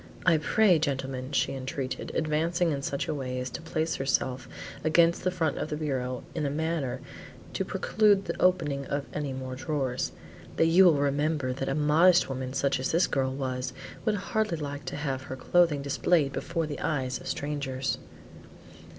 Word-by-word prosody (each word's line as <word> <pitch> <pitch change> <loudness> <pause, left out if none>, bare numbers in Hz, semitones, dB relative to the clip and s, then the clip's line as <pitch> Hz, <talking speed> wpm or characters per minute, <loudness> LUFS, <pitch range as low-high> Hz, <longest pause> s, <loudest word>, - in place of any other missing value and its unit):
"I 165 -3 +6
pray, 190 +1 +4
gentlemen," 135 -3 -2
she 140 - +1
entreated, 130 0 -4
advancing 165 +2 +1
in 140 -2 -2
such 140 0 -2
a 155 - -1
way 130 -3 -3
as 125 0 -4
to - - -6
place 160 0 -1
herself 130 -1 -1 0.3
against 165 +2 +4
the 185 - +2
front 165 -5 -1
of - - -3
the 150 - -2
bureau 130 -5 -2
in 155 - -2
a 140 - +1
manner 160 -3 -2 0.5
to - - 0
preclude 205 -2 +2
the - - -4
opening 150 -7 +2
of 140 0 -2
any 145 -2 -2
more 130 0 -5
drawers, 130 -1 -2 0.4
"that - - +4
you 175 +4 +6
will 170 -4 +6
remember 145 -1 0
that 135 +1 -3
a 135 - 0
modest 155 +4 +5
woman 130 -1 -4
such 140 -1 +1
as 130 - -1
this 170 +3 +4
girl 130 -1 0
was, 130 -1 -3 0.3
would 215 -2 +1
hardly 210 -2 -1
like 145 -1 -5
to - - -4
have 140 -3 -2
her 130 -1 -6
clothing 150 +1 +2
displayed 140 0 +2
before 165 +3 -2
the 150 -2 -5
eyes 130 -4 -1
of - - -9
strangers." 135 -3 -2
145 Hz, 180 wpm, -28 LUFS, 130-165 Hz, 0.5 s, I